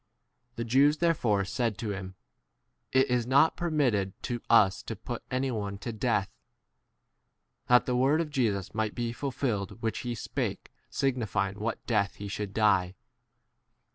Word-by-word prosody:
The 115 Hz, -, -3 dB
Jews 140 Hz, +6 st, +4 dB
therefore 120 Hz, -, +2 dB
said 115 Hz, +1 st, -1 dB
to 110 Hz, -4 st, -3 dB
him, 95 Hz, -1 st, -6 dB, 0.8 s
It 130 Hz, 0 st, +4 dB
is 125 Hz, -2 st, 0 dB
not 140 Hz, +5 st, +4 dB
permitted 130 Hz, -, +1 dB
to 120 Hz, -1 st, -2 dB
32 -, -, -33 dB
us 95 Hz, -4 st, +5 dB
to -, -, -6 dB
put -, -, -6 dB
any 130 Hz, +1 st, 0 dB
one 100 Hz, -3 st, -3 dB
to 115 Hz, +4 st, -5 dB
death; 105 Hz, -3 st, 0 dB, 1.4 s
that 125 Hz, 0 st, +5 dB
the 125 Hz, -, 0 dB
word 135 Hz, +5 st, +3 dB
of 160 Hz, -3 st, -2 dB
Jesus 110 Hz, -9 st, 0 dB
might 110 Hz, -1 st, -1 dB
be 120 Hz, -1 st, -2 dB
ful 140 Hz, +3 st, -3 dB
filled 115 Hz, -6 st, -2 dB
which 110 Hz, -2 st, -1 dB
he 120 Hz, -1 st, -3 dB
spake -, -, -4 dB, 0.2 s
signifying 110 Hz, -7 st, 0 dB
33 105 Hz, +1 st, -8 dB
what 115 Hz, 0 st, -3 dB
death 105 Hz, -4 st, +1 dB
he 100 Hz, -, -7 dB
should 100 Hz, 0 st, -4 dB
die. 95 Hz, -4 st, +2 dB
115 Hz, 165 wpm, -29 LUFS, 100-130 Hz, 1.4 s, us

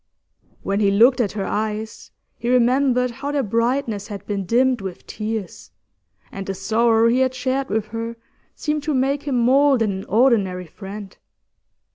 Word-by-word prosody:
When 200 Hz, +1 st, -1 dB
he 205 Hz, -2 st, +3 dB
looked 235 Hz, +6 st, +5 dB
at 210 Hz, -, -1 dB
her 200 Hz, -2 st, -3 dB
eyes, 220 Hz, +2 st, -4 dB, 0.3 s
he 235 Hz, -, -2 dB
remembered 250 Hz, 0 st, +3 dB
how 275 Hz, +4 st, -5 dB
their 285 Hz, -2 st, 0 dB
brightness 230 Hz, -1 st, -1 dB
had 205 Hz, -3 st, -8 dB
been 200 Hz, -3 st, -3 dB
dimmed 250 Hz, +2 st, +2 dB
with 190 Hz, -2 st, -7 dB
tears, 215 Hz, -2 st, -5 dB, 0.6 s
and 195 Hz, 0 st, -7 dB
the 195 Hz, -, -3 dB
sorrow 225 Hz, +3 st, +2 dB
he 240 Hz, +2 st, +3 dB
had 260 Hz, 0 st, +1 dB
shared 265 Hz, +1 st, -1 dB
with 215 Hz, 0 st, 0 dB
her 230 Hz, +1 st, -4 dB, 0.4 s
seemed 300 Hz, 0 st, -2 dB
to 300 Hz, 0 st, -1 dB
make 270 Hz, +2 st, +1 dB
him 265 Hz, -3 st, +1 dB
more 270 Hz, +3 st, +4 dB
than 225 Hz, -3 st, +1 dB
an 190 Hz, 0 st, -5 dB
ordinary 205 Hz, -5 st, +2 dB
friend. 195 Hz, +4 st, -9 dB
230 Hz, 165 wpm, -21 LUFS, 205-260 Hz, 0.6 s, looked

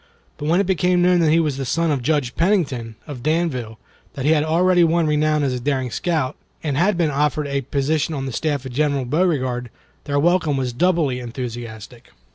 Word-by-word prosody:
But 150 Hz, -, -4 dB
when 170 Hz, +4 st, +3 dB
it 200 Hz, -, +2 dB
became 180 Hz, -1 st, +2 dB
known 180 Hz, 0 st, +4 dB
that 165 Hz, -2 st, +3 dB
he 160 Hz, +2 st, +4 dB
was 150 Hz, -5 st, 0 dB
the 135 Hz, -, -3 dB
son 165 Hz, +5 st, 0 dB
of 140 Hz, -3 st, 0 dB
Judge 140 Hz, -2 st, 0 dB
Pennington, 140 Hz, -, 0 dB
of 145 Hz, -6 st, -8 dB
Danville, 145 Hz, -8 st, -1 dB, 0.4 s
that 135 Hz, -, -4 dB
he 150 Hz, -, +4 dB
had 150 Hz, -2 st, +3 dB
already 175 Hz, +3 st, +3 dB
won 165 Hz, 0 st, +2 dB
renown 150 Hz, 0 st, +1 dB
as 135 Hz, -2 st, 0 dB
a 125 Hz, -, -3 dB
daring 130 Hz, -1 st, -1 dB
scout, 155 Hz, -5 st, -1 dB, 0.3 s
and 150 Hz, -4 st, -1 dB
had 180 Hz, +6 st, +2 dB
been 165 Hz, -4 st, +1 dB
offered 150 Hz, +1 st, 0 dB
a 140 Hz, -1 st, -1 dB
position 145 Hz, +4 st, -1 dB
on 135 Hz, -1 st, -3 dB
the 135 Hz, -, -4 dB
staff 145 Hz, 0 st, -2 dB
of 130 Hz, -, -6 dB
General 140 Hz, -1 st, 0 dB
Beauregard, 130 Hz, -5 st, 0 dB, 0.4 s
their 145 Hz, -1 st, 0 dB
welcome 160 Hz, -2 st, +2 dB
was 125 Hz, -2 st, -2 dB
doubly 160 Hz, -3 st, +1 dB
enthusiastic. 120 Hz, -2 st, -7 dB
150 Hz, 205 wpm, -21 LUFS, 130-165 Hz, 0.4 s, known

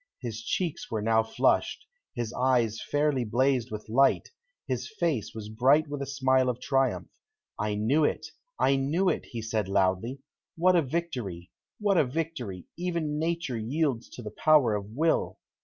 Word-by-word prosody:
His 115 Hz, -3 st, -5 dB
cheeks 170 Hz, +6 st, -2 dB
were 110 Hz, -3 st, -2 dB
now 110 Hz, 0 st, +4 dB
flushed, 110 Hz, -, +1 dB, 0.3 s
his 120 Hz, -1 st, -3 dB
eyes 125 Hz, -4 st, +1 dB
fairly 145 Hz, -3 st, +1 dB
blazed 125 Hz, +2 st, +1 dB
with 105 Hz, -1 st, -7 dB
light, 135 Hz, +5 st, +3 dB, 0.4 s
his -, -, -2 dB
face 120 Hz, -, -1 dB
was 105 Hz, -1 st, -6 dB
bright 135 Hz, +8 st, +3 dB
with 145 Hz, -1 st, -4 dB
a 140 Hz, -, -3 dB
smile 130 Hz, -2 st, +2 dB
of 125 Hz, -1 st, -2 dB
triumph. 130 Hz, -, 0 dB, 0.5 s
"I 105 Hz, 0 st, -1 dB
knew 125 Hz, +9 st, +2 dB
it! -, -, 0 dB, 0.3 s
I 135 Hz, -, +3 dB
knew 160 Hz, +8 st, +1 dB
it!" -, -, -1 dB
he 115 Hz, -3 st, -6 dB
said 110 Hz, -3 st, -1 dB
loudly. 95 Hz, +6 st, +1 dB, 0.4 s
"What 180 Hz, +2 st, +4 dB
a 170 Hz, -, +5 dB
victory! 125 Hz, -, -4 dB, 0.3 s
What 205 Hz, -3 st, +3 dB
a -, -, +5 dB
victory! 130 Hz, -, -4 dB
Even 170 Hz, -4 st, -2 dB
Nature 165 Hz, -6 st, -1 dB
yields 130 Hz, +1 st, -1 dB
to 125 Hz, -, -8 dB
the 105 Hz, -, -6 dB
power 140 Hz, -2 st, +4 dB
of 100 Hz, -1 st, -2 dB
Will!" 155 Hz, +9 st, 0 dB
130 Hz, 165 wpm, -28 LUFS, 110-150 Hz, 0.5 s, a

